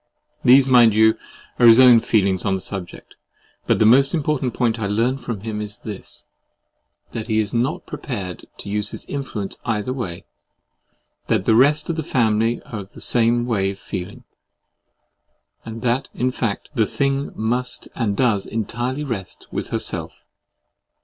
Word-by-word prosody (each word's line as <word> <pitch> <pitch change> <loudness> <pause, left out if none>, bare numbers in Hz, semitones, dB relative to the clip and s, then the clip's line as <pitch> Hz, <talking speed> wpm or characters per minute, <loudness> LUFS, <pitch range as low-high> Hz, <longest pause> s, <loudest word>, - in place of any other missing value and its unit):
These, 130 +2 +7
mind 120 -5 +5
you, 110 +1 +5 0.4
are 120 - +7
his 115 +1 +8
own 125 -3 +8
feelings 100 -5 +1
on 100 -1 +1
the - - -3
subject: 95 -2 -8 0.5
but - - +3
the 110 - +3
most 135 +7 +5
important 145 -5 -1
point 115 -2 0
I 105 - -1
learn 115 +6 0
from 115 -6 -5
him 105 -1 -4
is 105 -1 -6
this, 105 -4 -10 0.9
that 110 0 -5
he 110 -2 0
is 105 -2 0
not 125 +6 -1
prepared 100 - -6
to - - -9
use 105 0 0
his - - -8
influence 120 -8 -5
either 115 +2 -2
way—that 95 -3 -7
the 110 - +4
rest 145 +6 +4
of 165 - -5
the - - 0
family 115 -4 +1
are 110 - -7
of 100 0 -11
the - - -12
same 120 0 +2
way 100 -5 0
of 100 - -6
feeling; 95 0 -7 1.4
and 115 0 -8
that, 125 +2 0
in 125 +1 0
fact, 115 -5 -3
the 110 -6 +1
thing 140 0 -1
must 125 +3 -1
and 105 -5 -2
does 110 -7 +1
entirely 120 +6 -3
rest 110 -10 -6
with - - -4
herself. - - -5
115 Hz, 165 wpm, -21 LUFS, 105-125 Hz, 1.4 s, his